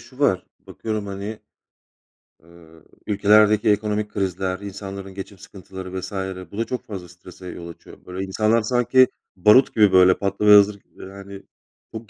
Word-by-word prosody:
şu 130 Hz, -, -17 dB
var. 95 Hz, -11 st, +1 dB
Bakıyorum, 110 Hz, -2 st, -5 dB
hani, 100 Hz, +2 st, -6 dB, 1.1 s
ııı, 80 Hz, -1 st, -19 dB, 0.2 s
ülkelerdeki 105 Hz, +1 st, +4 dB
ekonomik 105 Hz, 0 st, 0 dB
krizler, 95 Hz, -1 st, -3 dB
insanların 100 Hz, -1 st, -8 dB
geçim 95 Hz, +1 st, -9 dB
sıkıntıları 95 Hz, 0 st, -9 dB
vs. 95 Hz, -, -8 dB, 0.4 s
bu 100 Hz, -, -10 dB
da 115 Hz, -, -1 dB
çok 125 Hz, -2 st, -5 dB
fazla 95 Hz, -5 st, -8 dB
strese 90 Hz, +1 st, -14 dB
yol 85 Hz, -1 st, -8 dB
açıyor. 85 Hz, -, -15 dB
Böyle 90 Hz, +1 st, -5 dB
insanlar 110 Hz, +4 st, +1 dB
sanki, 125 Hz, +3 st, +3 dB, 0.3 s
barut 105 Hz, +8 st, +4 dB
gibi 105 Hz, -3 st, +5 dB
böyle 95 Hz, 0 st, +6 dB
patlamaya 105 Hz, +1 st, +4 dB
hazır 100 Hz, +1 st, +4 dB
gi 100 Hz, -, -24 dB
yani 100 Hz, 0 st, -11 dB, 0.5 s
çok 110 Hz, -2 st, -9 dB
100 Hz, 150 wpm, -22 LUFS, 95-105 Hz, 1.1 s, böyle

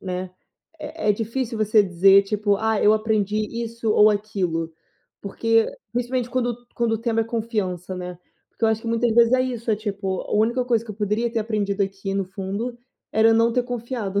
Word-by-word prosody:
né, 185 Hz, 0 st, -4 dB, 0.5 s
é 300 Hz, -6 st, -4 dB
é -, -, +6 dB
difícil 230 Hz, +2 st, -3 dB
você 215 Hz, 0 st, +4 dB
dizer 195 Hz, +2 st, +5 dB
tipo: 205 Hz, 0 st, 0 dB
"Ah, 220 Hz, 0 st, 0 dB
eu 210 Hz, -, +6 dB
aprendi 215 Hz, -1 st, 0 dB, 0.3 s
isso 230 Hz, -1 st, -3 dB
ou 210 Hz, 0 st, +6 dB
aquilo". 185 Hz, -6 st, -2 dB, 0.5 s
Porque, 225 Hz, +3 st, +1 dB, 0.3 s
principalmente, 245 Hz, 0 st, -2 dB
quando 245 Hz, -2 st, -1 dB, 0.2 s
quando 235 Hz, -1 st, +1 dB
o 225 Hz, -, 0 dB
tema 225 Hz, -1 st, 0 dB
é -, -, -5 dB
confiança, 210 Hz, -6 st, -3 dB
né, 180 Hz, 0 st, -6 dB, 0.3 s
porque -, -, -4 dB
eu 225 Hz, -, +4 dB
acho 220 Hz, 0 st, 0 dB
que 230 Hz, -, -4 dB
muitas 230 Hz, 0 st, +1 dB
vezes 235 Hz, +1 st, +5 dB
é 255 Hz, -, +4 dB
isso, 240 Hz, -3 st, -3 dB
é 215 Hz, -, +2 dB
tipo, 200 Hz, -3 st, -3 dB
a -, -, -8 dB
única 235 Hz, +4 st, +2 dB
coisa 235 Hz, -2 st, +1 dB
que 225 Hz, -, -8 dB
eu 210 Hz, -, -7 dB
poderia 215 Hz, +3 st, 0 dB
ter 230 Hz, -, 0 dB
aprendido 210 Hz, -2 st, -1 dB
aqui 195 Hz, 0 st, -3 dB
no 195 Hz, -1 st, 0 dB
fundo 200 Hz, +6 st, -5 dB, 0.3 s
era 220 Hz, +1 st, +4 dB
eu -, -, +4 dB
não 230 Hz, +1 st, +3 dB
ter 250 Hz, +1 st, +1 dB
confiado, 235 Hz, -5 st, -3 dB
220 Hz, 205 wpm, -23 LUFS, 200-235 Hz, 0.5 s, é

